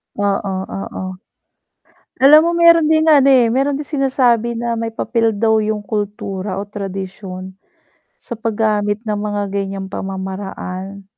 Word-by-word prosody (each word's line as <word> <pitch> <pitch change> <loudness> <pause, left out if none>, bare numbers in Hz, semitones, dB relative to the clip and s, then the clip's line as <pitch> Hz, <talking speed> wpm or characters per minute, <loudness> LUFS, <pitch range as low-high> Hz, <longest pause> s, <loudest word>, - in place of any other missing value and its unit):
Oo, 200 -1 -1
oo. 195 0 -6 1.2
Alam 300 +3 +9
mo 340 - +1
meron 335 -2 +6
ding 315 0 +3
ano 275 -2 +6
eh, 250 -4 +5
meron 275 +3 +1
din 295 - -4
sinasabi 250 -5 +1
na 235 0 -2
may 225 0 -3
papel 230 -1 0
daw 220 +1 +2
yung 215 -1 -2
kultura 200 -2 -4
o 195 - -3
tradisyon 195 -2 -7 0.7
sa - - -12
pag-gamit 215 -1 -1
ng 210 -2 -1
mga 205 -1 -3
ganyang 195 -1 -3
pamamaraan. 190 0 -6
210 Hz, 135 wpm, -18 LUFS, 195-235 Hz, 1.2 s, Alam